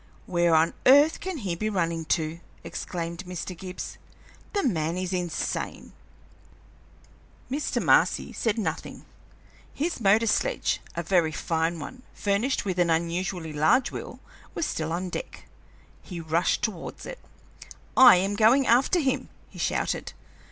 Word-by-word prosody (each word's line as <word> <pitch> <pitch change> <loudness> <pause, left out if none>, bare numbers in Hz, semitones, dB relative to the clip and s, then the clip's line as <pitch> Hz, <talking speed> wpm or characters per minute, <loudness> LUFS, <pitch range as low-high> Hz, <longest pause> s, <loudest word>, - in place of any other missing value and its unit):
"Where 175 -2 +2
on 160 +1 +3
earth 285 +4 +6
can 375 -2 -4
he 200 -9 -3
be 215 +5 -2
running 170 -5 -1
to?" 160 0 -1 0.2
exclaimed 170 +1 -5
Mr. 180 0 -5
Gibbs. 180 +1 -7 0.5
"The 405 - 0
man 165 - 0
is 185 0 -3
insane!" 175 -2 -3 1.6
Mr. 290 +3 -1
Marcy - - +3
said 225 -2 0
nothing. 165 -8 -4 0.7
His 315 -2 -3
motor 215 +2 +4
sledge, - - 0
a 170 - -2
very 170 -2 +2
fine 165 +2 -1
one, 250 +11 -8
furnished 205 +7 0
with 185 -2 -2
an 175 -1 +3
unusually 170 0 -1
large 155 - +3
wheel, - - -7 0.4
was 335 - -1
still 160 - -3
on 175 +2 -2
the 180 - -6
deck. - - -11 0.6
He 180 -3 -8
rushed 165 +2 0
towards 195 -7 -4
it. - - -7 0.8
"I 255 -4 +9
am 195 +3 0
going 230 +6 +5
after 255 +10 +4
him!" 270 -3 -1 0.2
he - - -12
shouted. - - -1
185 Hz, 140 wpm, -26 LUFS, 165-240 Hz, 1.6 s, I